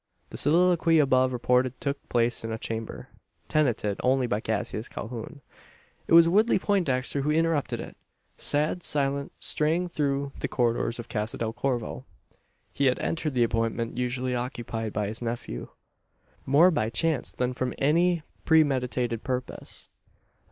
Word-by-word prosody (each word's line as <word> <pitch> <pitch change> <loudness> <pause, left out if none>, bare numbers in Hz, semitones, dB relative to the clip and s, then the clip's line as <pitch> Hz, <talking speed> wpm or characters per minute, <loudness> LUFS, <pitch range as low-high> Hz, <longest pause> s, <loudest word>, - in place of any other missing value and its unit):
The - - -7
soliloquy 165 +1 +4
above 130 -3 +4
reported 125 +1 +1
took 140 0 -4
place 120 -1 +1
in 115 - -4
a 110 - -2
chamber, 110 0 -6 0.4
tenanted 120 -9 +1
only 130 0 +3
by 105 -3 0
Cassius 110 0 -3
Calhoun. 120 +5 -7 0.7
It - - 0
was 165 0 +9
Woodley 215 +7 +4
Poindexter 145 -10 0
who 145 - -1
interrupted 160 -2 +1
it. - - -8 0.4
Sad, 150 +4 -1
silent, 140 -2 -1
straying 165 +4 0
through 140 -3 -1
the - - -1
corridors 120 -1 0
of 120 -1 -7
Casa 105 0 -3
del 115 -1 -2
Corvo, 120 - -2 0.7
he 140 - +2
had 130 - +2
entered 160 -4 -2
the 120 - +4
apartment 115 0 -1
usually 125 +1 -1
occupied 120 -3 -3
by 105 0 -1
his 110 +3 -6
nephew 115 - -4 0.8
more 155 +7 +6
by 115 -9 0
chance 140 +4 0
than 125 0 -1
from 125 0 -3
any 170 +3 +2 0.2
premeditated 125 -7 +2
purpose. 125 -1 -5
130 Hz, 145 wpm, -27 LUFS, 115-150 Hz, 0.8 s, was